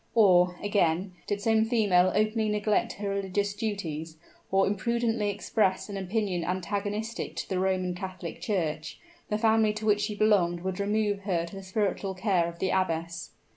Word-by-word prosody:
Or, 180 -5 +5
again 185 -2 +1
did 205 0 -2
some 220 0 +3
female 205 -6 +3
openly 215 +1 +1
neglect 210 0 +1
her 200 0 -4
religious 200 +1 -1
duties, 165 -7 -4 0.3
or 195 0 +3
imprudently 225 +1 0
express 200 -1 0
an 200 - -5
opinion 190 -2 -1
antagonistic 205 +5 -3
to - - -4
the 185 - -1
Roman 185 -1 0
Catholic 180 -2 -7
Church, 160 -7 -2 0.3
the 210 - +1
family 220 -1 +3
to 215 0 -5
which 210 -1 +3
she 210 0 -2
belonged 190 -5 +3
would 185 +1 -3
remove 205 0 +1
her 185 -4 -1
to 170 - -10
the 195 - -6
spiritual 195 0 -1
care 185 -3 +1
of 170 - -11
the 190 - 0
abbess. 170 -2 -1
200 Hz, 165 wpm, -28 LUFS, 180-210 Hz, 0.3 s, Or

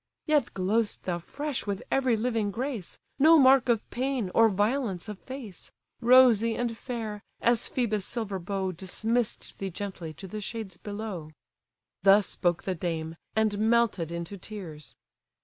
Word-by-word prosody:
Yet 295 -5 +2
glow'st 205 +4 0
thou 175 -2 -2
fresh 285 - -4
with 200 -1 -2
every 260 -4 +2
living 225 -2 0
grace; 235 -2 -4 0.2
No 320 +4 +8
mark 265 -3 +6
of 230 -2 +2
pain, 250 -6 -1
or 225 0 +6
violence 205 -1 0
of 210 -2 -7
face: 255 -9 -9 0.3
Rosy 235 -2 +6
and 240 -1 -2
fair! 225 -4 -5 0.2
as 240 0 +2
Phœbus' 215 -5 0
silver 200 -1 -2
bow 190 +1 -2
Dismiss'd 220 +6 -3
thee 195 - -3
gently 185 -3 -6
to 190 - -9
the 215 +3 -6
shades 210 -3 -5
below." 205 -6 -6 0.7
Thus 195 +1 +6
spoke 175 -1 -1
the 190 - -1
dame, 165 -2 -3 0.2
and 215 -2 +1
melted 220 -7 +2
into 170 +3 -5
tears. 175 -8 -8
215 Hz, 150 wpm, -28 LUFS, 190-240 Hz, 0.7 s, No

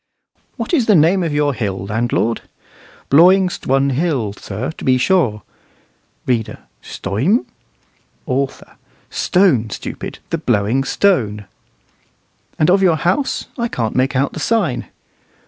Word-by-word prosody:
"What - - -4
is 260 -9 +2
the 210 - +5
name 170 +4 +4
of 165 -3 -1
your 145 -1 +1
hill, 100 -6 -3
landlord?" 115 +2 -1 0.7
"Blawing 180 +5 +6
STWUN 135 -4 0
Hill, 130 - -1
sir, 105 +8 -5
to - - -9
be 130 -1 +3
sure." 125 - +1 0.8
[READER. 115 -4 -1 0.2
"Stuym?" 130 - -1 0.8
AUTHOR: 135 -1 -3 0.3
"Stone, 160 - +2
stupid - - -6
the - - -1
Blowing 110 +7 +1
Stone."] 110 - +1 1.1
"And 155 +3 +3
of 195 +1 +4
your 175 -4 +3
house? 185 - 0
I 235 - 0
can't 115 - -3
make 130 +2 +1
out 135 +2 0
the - - -6
sign." 195 - 0
135 Hz, 130 wpm, -18 LUFS, 115-180 Hz, 1.1 s, Blawing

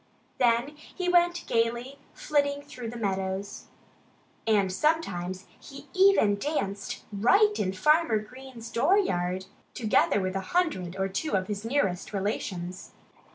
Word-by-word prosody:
Then 240 +2 +3
he 360 +4 -6
went 350 -1 +3
gaily 235 +4 -1 0.2
flitting 285 -1 0
through 250 -5 -7
the 240 - -7
meadows. 195 -1 -3 0.8
And 200 -4 +3
sometimes 190 - -1
he 275 -1 -12
even 375 - +5
danced 200 -8 -3
right 395 - +4
in 185 - 0
Farmer 300 - +3
Green's 240 +1 -9
dooryard, 190 - +1 0.3
together 215 -2 +2
with 185 0 -2
a - - +1 0.2
hundred 185 - 0
or 195 0 0
two 195 +11 -3
of 185 - -2
his 205 0 -4
nearest 225 -7 -1
relations. 185 -2 -4
230 Hz, 125 wpm, -27 LUFS, 195-290 Hz, 0.8 s, even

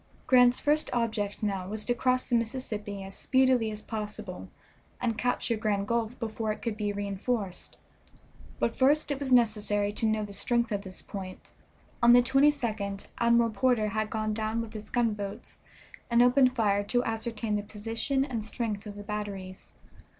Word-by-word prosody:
Grant's 250 -1 +5
first 300 +1 +2
object 220 -4 -1
now 195 -3 -1
was 215 +1 -3
to 245 - +2
cross 255 +1 +1
the 240 - +1
Mississippi 220 -4 -3
as 195 0 -8
speedily 260 -1 +3
as 215 0 -5
possible 210 -3 -6 0.5
and 230 -2 0
capture 245 0 0
Grand 205 -2 -1
Gulf 235 +1 -1
before 220 -1 -2
it 215 - -6
could 230 -3 -2
be 210 -1 -1
re 205 0 -3
enforced; 200 -1 -3 0.8
but 230 - 0
first 290 +3 +3
it 280 - -2
was 275 -2 -3
necessary 210 -4 +3
to 225 - 0
know 215 -1 0
the 200 - -9
strength 235 +3 0
of 205 -1 -1
this 190 -2 -7
point. 190 -2 -8 0.5
On 235 0 +7
the 245 0 +7
22d 240 -7 +1
Admiral 235 -1 +4
Porter 220 0 +2
had 215 +1 -1
gone 215 -1 -1
down 220 +1 -1
with 230 -1 -5
his 215 -1 -8
gunboats 215 -3 -2 0.5
and 235 0 +5
opened 250 0 +4
fire 205 -4 +2
to 245 +4 +1
ascertain 225 -1 -2
the 205 - 0
position 225 +6 -2
and 240 -6 -3
strength 215 -1 -3
of 205 - -7
the 205 - -8
batteries. 200 -3 -6
220 Hz, 170 wpm, -29 LUFS, 205-245 Hz, 0.8 s, On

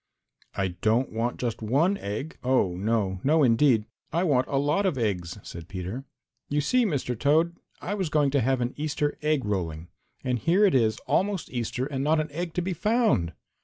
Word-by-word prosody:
"I 95 -1 0
don't 110 +8 0
want 115 +2 -2
just 120 -3 -2
one 145 - +2
egg, 110 +11 -5
oh, 125 -8 +2
no, 100 -1 0
no 155 +2 +4
indeed! 120 -2 +4 0.3
I 170 - +1
want 135 -7 +2
a 140 - -1
lot 150 +8 +2
of 165 -8 -1
eggs," 95 -6 -2
said 85 -1 -9
Peter. 95 +8 -5 0.4
"You 145 - +1
see, 245 - +2
Mr. 135 -7 -1
Toad, 155 +7 +2 0.3
I 200 - -3
was 190 -5 -1
going 145 -2 +2
to 140 -1 +2
have 130 +1 +1
an 120 +1 -1
Easter 150 -1 -1
egg 150 -4 +1
rolling, 85 -5 -3 0.3
and 125 -1 0
here 180 - +4
it 195 - +3
is 110 -4 +3
almost 195 -2 0
Easter 125 +1 -2
and 135 -1 -3
not 155 +2 +3
an 155 -1 -2
egg 170 +2 -4
to 180 - 0
be 185 +1 -1
found!" 210 - +1
135 Hz, 195 wpm, -26 LUFS, 110-160 Hz, 0.4 s, no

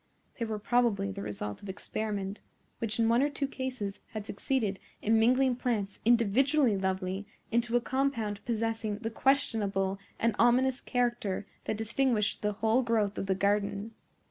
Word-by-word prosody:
They 230 - 0
were 220 -1 -3
probably 210 -3 +1
the 200 0 -6
result 105 - -5
of 200 - -8
experiment, 205 0 -3 0.4
which 220 -1 -1
in 230 -1 +3
one 235 +2 +4
or 290 - +3
two 280 -1 -2
cases 255 -7 -4
had 215 -2 -4
succeeded 210 -3 -1 0.2
in 220 +1 +3
mingling 255 +2 +4
plants 215 -6 -1
individually 240 +3 +4
lovely 190 +1 -2 0.2
into 235 +1 +1
a - - 0
compound 235 -6 -1
possessing 225 -2 -1
the 225 +1 -4
questionable 205 -7 +1 0.2
and 230 -1 +1
ominous 250 +2 +4
character 240 -6 -1 0.2
that 220 - -1
distinguished 220 -1 +1
the 210 0 0
whole 220 +4 +2
growth 220 -4 0
of 195 - -3
the 190 - +2
garden. 200 +2 0
220 Hz, 155 wpm, -30 LUFS, 200-245 Hz, 0.4 s, one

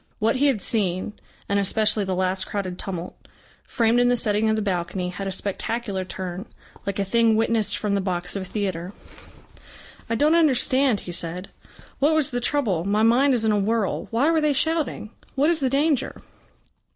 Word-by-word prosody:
What 225 +4 +1
he 285 +2 +3
had 250 -8 +1
seen, 195 -2 -1 0.3
and 200 0 +1
especially 210 +1 +1
the 190 -1 -2
last 185 +1 0
crowded 185 -3 -4
tumult, 180 -2 -6 0.4
framed 235 -1 +2
in 245 - +4
the 245 0 +2
setting 215 0 +1
of 220 - +2
the 215 - -1
balcony, 180 -1 -2
had 195 +2 -5
a - - -2
spectacular 200 +1 -3
turn, 185 0 -6 0.4
like 200 - -2
a 200 - 0
thing 230 +2 +3
witnessed 225 -1 +1
from 210 -2 -2
the 200 - +1
box 180 -1 -3
of 200 - -2
a - - -6
theatre. 185 -2 -4 1.2
"I 230 - 0
don't 300 +6 +3
understand," 270 - +3
he 175 - -7
said. 175 +2 -4 0.5
"What 300 +3 +3
was 305 -2 +2
the 245 0 -2
trouble? 230 - +1
My 205 +3 +1
mind 255 +4 +4
is 225 -2 +1
in 220 - +3
a 210 - +2
whirl. 215 0 -1
Why 260 +8 +2
were 320 -1 +2
they 300 -1 +2
shouting? 300 -7 -1 0.2
What 290 +5 +3
is 335 - +2
the 265 -3 +1
danger?" 280 0 0
215 Hz, 190 wpm, -23 LUFS, 190-250 Hz, 1.2 s, in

